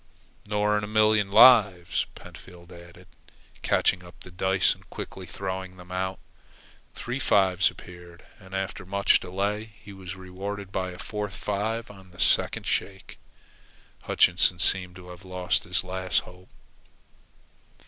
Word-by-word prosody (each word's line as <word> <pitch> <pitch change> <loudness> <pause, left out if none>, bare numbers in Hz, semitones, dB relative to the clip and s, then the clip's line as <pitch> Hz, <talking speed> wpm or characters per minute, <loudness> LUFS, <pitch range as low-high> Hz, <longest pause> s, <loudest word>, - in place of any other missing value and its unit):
"Nor 105 0 +1
in - - -6
a - - -3
million 110 -1 +3
lives," 105 -7 +6
Pentfield 90 0 -14
added, 85 +1 -14 0.5
catching 90 -1 +2
up 90 0 -15
the 90 - -12
dice 95 +1 +2
and - - -20
quickly 95 -1 -8
throwing 95 0 -5
them 90 0 -13
out. 95 +1 -2 0.8
Three 125 +3 -4
fives 95 -6 +3
appeared, 90 -1 -13
and, 95 -1 -10
after 95 0 -3
much 100 +2 +3
delay, 105 +4 -3
he 100 -1 -12
was 95 -1 -8
rewarded 95 +1 -7
by 95 -1 -2
a 90 - -9
fourth 105 0 -5
five 110 +3 -3
on 95 -2 -15
the 85 - -17
second - - +2
shake. - - -3 0.8
Hutchinson 90 +1 +3
seemed 90 0 +1
to 90 -1 -12
have 90 +1 -11
lost 90 -1 -1
his 90 +1 -1
last 95 0 -1
hope. 90 +1 -16
95 Hz, 140 wpm, -26 LUFS, 90-100 Hz, 0.8 s, lives